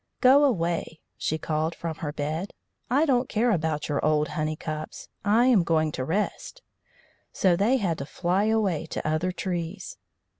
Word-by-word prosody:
"Go 270 +3 +6
away," 170 - -1 0.2
she 155 - -2
called 160 +1 -2
from 165 -2 -5
her 150 -3 -4
bed; 155 +6 -3 0.4
"I 280 +6 +3
don't 255 -3 +1
care 230 +2 +2
about 160 -5 -1
your 145 - -1
old 150 0 +2
honey 155 -1 -2
cups; 155 0 -6
I 215 +4 +4
am 245 -7 +5
going 160 -2 +1
to 130 - -3
rest." 210 - -3 0.7
So 185 -3 +3
they 215 +9 +3
had 180 -8 -1
to 140 - -5
fly 185 +5 0
away 210 -8 +1
to - - -4
other 155 +4 0
trees. 180 - -4
170 Hz, 165 wpm, -26 LUFS, 155-210 Hz, 0.7 s, Go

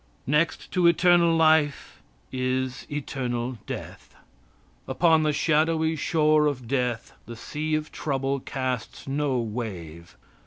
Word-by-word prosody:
Next 150 +4 0
to 180 -2 +3
external 170 -1 +4
life 155 -2 +2 0.3
is 130 0 -2
eternal 125 -4 -3
death. - - -8 0.7
Upon 165 -2 +3
the 155 -1 +2
shadowy 160 +1 +1
shore 155 0 +2
of 130 -5 -3
death 125 -3 -2
the 115 - -7
sea 155 +6 -3
of 155 0 -3
trouble 135 -1 -2
casts 130 -3 -4
no 140 -1 0
wave. 95 -8 -6
140 Hz, 115 wpm, -25 LUFS, 125-155 Hz, 0.7 s, external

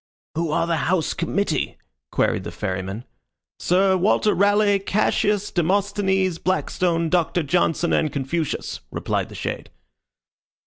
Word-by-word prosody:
"Who 165 +1 -1
are 155 - +1
the 170 -1 0
house 165 +2 0
committee?" 170 0 -1 0.3
queried - - +1
the - - -5
Ferryman. 95 +3 -4 0.5
"Sir 190 +2 +3
Walter 205 +3 +2
Raleigh, 205 +1 +3
Cassius, 205 +1 +1
Demosthenes, 190 0 +1
Blackstone, 175 -2 0
Doctor 175 0 +1
Johnson, 170 +2 +1
and 155 - +2
Confucius," 140 +3 -3
replied - - -2
the - - -11
shade. - - -4
180 Hz, 120 wpm, -23 LUFS, 165-195 Hz, 0.5 s, Sir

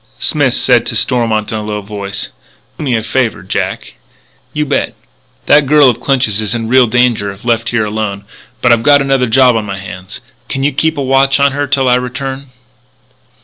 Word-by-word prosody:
Smith - - 0
said - - +3
to - - -4
Stormont 115 -4 0
in 110 - -2
a - - -5
low 105 0 -4
voice: 100 -1 -5 0.5
"Do - - -4
me 130 -4 0
a 110 - -1
favour, 115 -4 -1
Jack?" 95 - -4 0.6
"You 150 0 -2
bet." 145 - -1 0.5
"That 145 -2 +4
girl 145 -2 +5
of 120 - -8
Clinch's 120 -7 0
is 110 +2 -2
in 115 -1 -3
real 130 0 +5
danger 115 -3 +1
if 100 +4 -14
left 115 -1 0
here 115 -3 0
alone. 105 -2 -4 0.4
But 120 - +4
I've 115 - +1
got 145 +3 +5
another 135 -2 +1
job 125 +1 +4
on 110 - 0
my 100 -1 -5
hands. 95 0 -9 0.3
Can 135 - -3
you 145 - +2
keep 160 +3 0
a 140 - -1
watch 135 +1 +2
on 140 0 +3
her 145 +1 -2
till 135 -1 +1
I 125 0 +4
return?" 135 +2 -5
125 Hz, 200 wpm, -13 LUFS, 110-135 Hz, 0.6 s, girl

